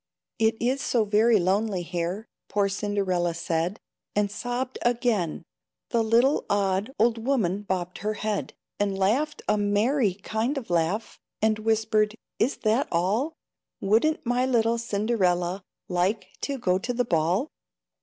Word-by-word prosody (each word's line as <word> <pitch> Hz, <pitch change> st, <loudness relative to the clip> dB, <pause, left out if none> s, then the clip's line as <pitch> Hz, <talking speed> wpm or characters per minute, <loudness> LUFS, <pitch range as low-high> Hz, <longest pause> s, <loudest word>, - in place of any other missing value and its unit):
"It 225 Hz, 0 st, +3 dB
is 260 Hz, +3 st, 0 dB
so 230 Hz, -3 st, +1 dB
very 215 Hz, +2 st, +4 dB
lonely 190 Hz, +1 st, +1 dB
here," 175 Hz, +4 st, -3 dB, 0.2 s
Poor 205 Hz, -1 st, +2 dB
Cinderella 195 Hz, -4 st, 0 dB
said, 170 Hz, +3 st, -1 dB, 0.4 s
And 205 Hz, -1 st, +1 dB
sobbed 245 Hz, +4 st, -3 dB
again. 235 Hz, -, 0 dB, 0.5 s
The 235 Hz, -3 st, +3 dB
little 235 Hz, +6 st, +3 dB
odd 200 Hz, +2 st, +1 dB
Old 225 Hz, 0 st, +2 dB
woman 210 Hz, -8 st, +1 dB
bobbed 185 Hz, -3 st, -3 dB
her 215 Hz, +2 st, -2 dB
head, 210 Hz, -1 st, -3 dB, 0.2 s
And 200 Hz, -1 st, 0 dB
laughed 255 Hz, +11 st, +1 dB
a 210 Hz, -, +2 dB
merry 205 Hz, +1 st, +2 dB
kind 220 Hz, +7 st, -2 dB
of 235 Hz, -9 st, -5 dB
laugh, 175 Hz, +6 st, 0 dB, 0.2 s
And 215 Hz, 0 st, +2 dB
whispered, 215 Hz, -1 st, +1 dB, 0.2 s
"Is 250 Hz, +6 st, +1 dB
that 225 Hz, +5 st, +2 dB
all? 205 Hz, -, +1 dB, 0.5 s
Wouldn't 230 Hz, +11 st, +2 dB
my 245 Hz, +1 st, +1 dB
little 235 Hz, -2 st, +2 dB
Cinderella 200 Hz, -5 st, 0 dB, 0.3 s
Like 185 Hz, +2 st, 0 dB
to 280 Hz, -1 st, -2 dB
go 185 Hz, -6 st, +1 dB
to 245 Hz, +5 st, -3 dB
the 245 Hz, 0 st, +1 dB
ball? 175 Hz, -, +1 dB
215 Hz, 140 wpm, -26 LUFS, 190-235 Hz, 0.5 s, very